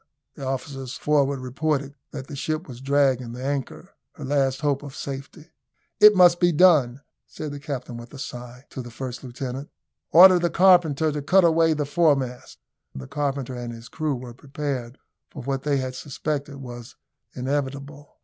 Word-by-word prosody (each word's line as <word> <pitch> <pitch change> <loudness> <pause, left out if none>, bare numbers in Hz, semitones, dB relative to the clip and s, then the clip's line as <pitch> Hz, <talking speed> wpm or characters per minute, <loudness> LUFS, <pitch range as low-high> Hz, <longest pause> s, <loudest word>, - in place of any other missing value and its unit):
The 140 - -10
officers 135 -1 -4
forward 140 -2 +1
reported 140 +2 -2 0.2
that 135 -3 -7
the 140 - -9
ship 155 +4 -3
was 125 -2 -10
dragging 135 -3 +1
the 125 +1 -7
anchor 140 +6 -4 0.2
her 150 -6 -8
last 135 -1 0
hope 145 -2 0
of 140 -2 -9
safety. 140 +4 -8 0.5
"It 210 0 +9
must 175 -2 +6
be 175 -1 +4
done," 145 -7 +4 0.3
said 155 -2 -7
the 145 - -7
captain 135 -5 -6
with 120 +1 -11
a 140 - -10
sigh, 125 -1 -8
to 130 - -6
the 120 - -9
first 125 +2 -7
lieutenant. 130 +2 -6 0.4
"Order 180 +1 +9
the 175 0 +1
carpenter 170 -5 +4
to 150 0 -3
cut 185 +6 +4
away 165 -1 +4
the 150 -1 -1
foremast." 140 -5 0 0.4
The 65 - -7
carpenter 140 - -3
and 120 -1 -5
his 115 0 -11
crew 155 -3 -2
were 125 -1 -8
prepared 135 -1 -5 0.3
for 140 - -9
what 135 +1 -2
they 145 0 0
had 130 -1 -3
suspected 145 +1 -4
was 120 -3 -9 0.4
inevitable. 140 +2 -4
140 Hz, 170 wpm, -24 LUFS, 130-150 Hz, 0.5 s, It